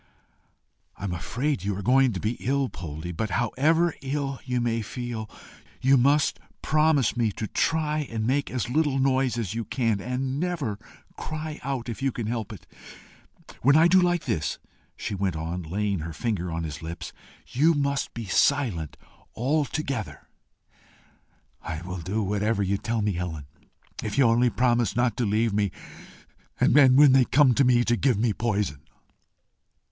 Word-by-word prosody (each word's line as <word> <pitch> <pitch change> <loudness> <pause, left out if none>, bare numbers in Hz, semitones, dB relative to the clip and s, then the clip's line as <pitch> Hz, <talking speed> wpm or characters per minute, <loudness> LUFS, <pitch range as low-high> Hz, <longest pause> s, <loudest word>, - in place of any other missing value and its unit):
"I - - -10
am 95 -3 -2
afraid 120 - -2
you 100 -1 -2
are 100 - -5
going 130 +2 +4
to 95 - -4
be 110 - -1
ill, 135 0 0
Poldie; 80 +1 -7
but, 105 +6 -3
however 155 - +2
ill 135 -1 -3
you 125 -1 -1
may 115 -1 0
feel, 115 -1 -5 0.5
you 135 +2 +4
must 140 +3 +3 0.2
promise 155 -5 +2
me 115 -3 +1
to 110 - -4
try 155 - 0
and 110 -1 -3
make 140 +4 0
as 125 -2 -2
little 145 +1 +1
noise 130 -2 +1
as 110 -4 -3
you 115 0 -3
can, 115 -5 -1
and 130 +3 -2
never 155 - -2 0.4
cry 155 0 -5
out 130 -3 -3
if 115 +2 -6
you 135 0 +1
can 115 -2 -5
help 110 -1 -3
it. 100 -8 -11 1.0
When 140 +4 +5
I 160 +2 +6
do 185 +2 +5
like 175 -1 +1
this," 75 -2 -1 0.4
she - - -4
went 95 -3 -1
on, 85 +3 -4
laying 100 +3 -2
her 80 +1 -5
finger 95 -4 -2
on 80 0 -3
his 75 -2 -6
lips, 80 +1 -7 0.4
"you 155 +6 +3
must 140 0 -1
be 115 -1 -5
silent 100 - +1 0.4
altogether." 135 - -2 1.3
"I 80 +2 -5
will 90 0 -5
do 100 +6 -2
whatever 105 +1 0
you 100 +1 0
tell 115 -2 -2
me, 105 - +1
Helen, 85 -5 -4 0.6
if 110 +2 -4
you 140 - +5
will 115 - +5
only 120 +1 +3
promise 120 -3 +1
not 120 0 +1
to 120 - 0
leave 110 +1 +1
me, 100 -1 +1 0.9
and, - - +4 0.2
when 145 -1 +8
they 130 0 +6
come 135 0 +4
for 140 - +3
me, 125 -1 +4
to 120 - +2
give 125 -2 +1
me 110 0 +1
poison." 100 -10 -2
120 Hz, 170 wpm, -26 LUFS, 100-135 Hz, 1.3 s, when